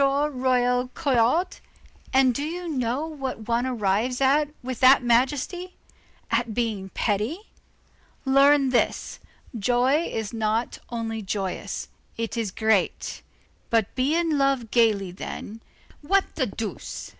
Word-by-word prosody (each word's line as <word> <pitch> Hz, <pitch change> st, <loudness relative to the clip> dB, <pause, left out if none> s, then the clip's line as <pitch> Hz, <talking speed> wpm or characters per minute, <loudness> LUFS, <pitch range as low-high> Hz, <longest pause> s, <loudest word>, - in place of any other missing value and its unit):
Royer 255 Hz, -3 st, +2 dB
Collard. 280 Hz, +5 st, +2 dB, 0.5 s
And 260 Hz, -1 st, +4 dB
do 280 Hz, -, -3 dB
you 345 Hz, +4 st, -4 dB
know 260 Hz, -1 st, -1 dB
what 270 Hz, -8 st, -6 dB
one 235 Hz, +2 st, +1 dB
arrives 230 Hz, +1 st, 0 dB
at 285 Hz, +2 st, +3 dB
with 255 Hz, -2 st, -4 dB
that 260 Hz, 0 st, +6 dB
majesty? 285 Hz, +10 st, 0 dB, 0.6 s
at 230 Hz, -1 st, 0 dB
being 215 Hz, -5 st, -2 dB
petty. 230 Hz, -, -1 dB, 0.7 s
Learn 275 Hz, +1 st, +5 dB
this: 250 Hz, -, 0 dB, 0.4 s
joy 250 Hz, +8 st, +2 dB
is 220 Hz, -1 st, -4 dB
not 225 Hz, +1 st, -1 dB
only 225 Hz, -2 st, -3 dB
joyous; 190 Hz, -2 st, -4 dB, 0.3 s
it 230 Hz, 0 st, -3 dB
is 225 Hz, -3 st, -1 dB
great. 220 Hz, 0 st, 0 dB, 0.5 s
But 225 Hz, -3 st, +1 dB
be 270 Hz, +5 st, +1 dB
in 330 Hz, -4 st, +1 dB
love 275 Hz, -5 st, +1 dB
gayly 215 Hz, -6 st, +3 dB
then, 210 Hz, +4 st, -7 dB, 0.4 s
what 390 Hz, +6 st, +1 dB
the 260 Hz, -5 st, 0 dB
deuce! 215 Hz, +1 st, -6 dB
250 Hz, 120 wpm, -25 LUFS, 225-280 Hz, 0.7 s, that